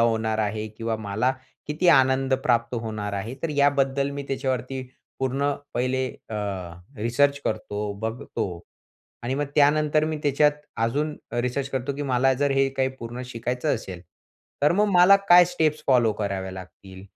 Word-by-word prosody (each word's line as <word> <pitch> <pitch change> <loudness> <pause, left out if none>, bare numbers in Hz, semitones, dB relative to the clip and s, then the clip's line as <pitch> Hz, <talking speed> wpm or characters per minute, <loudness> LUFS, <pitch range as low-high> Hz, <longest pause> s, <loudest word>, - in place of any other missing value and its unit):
होणार 110 -1 +1
आहे 110 0 -1
किंवा 115 +1 -3
मला 110 +4 0 0.3
किती 155 +4 0
आनंद 130 -2 +4
प्राप्त 120 0 +1
होणार 110 -2 -4
आहे. 105 +5 -4
तर 165 - 0
याबद्दल 140 -1 +2
मी 140 0 -5
त्याच्यावरती 130 -1 -2 0.4
पूर्ण 135 +2 0 0.2
पहिले 130 +1 0 0.2
अ, 110 - -4 0.6
रिसर्च 140 +6 +1
करतो, 105 -1 -3
बघतो. 110 -5 -4 0.6
आणि 125 +3 -2
मग 145 - 0
त्यानंतर 150 +1 +3
मी 155 0 -2
त्याच्यात 145 +1 +3 0.3
अजून 150 +6 -1 0.2
रिसर्च 125 +3 -1
करतो 130 +1 -2
की 145 - -3
मला 135 -1 +2
जर 140 +2 0
हे 135 0 +3
काही 130 0 +2
पूर्ण 120 +2 -6
शिकायचं 125 +4 -2
असेल, 95 -7 -7 0.6
तर 150 - +5
मग 205 +4 +3
मला 180 +2 +7
काय 175 0 +9
स्टेप्स 160 -3 0
फॉलो 120 -5 +4
कराव्या 100 -2 -3
लागतील 95 0 -11
130 Hz, 150 wpm, -25 LUFS, 110-145 Hz, 0.6 s, काय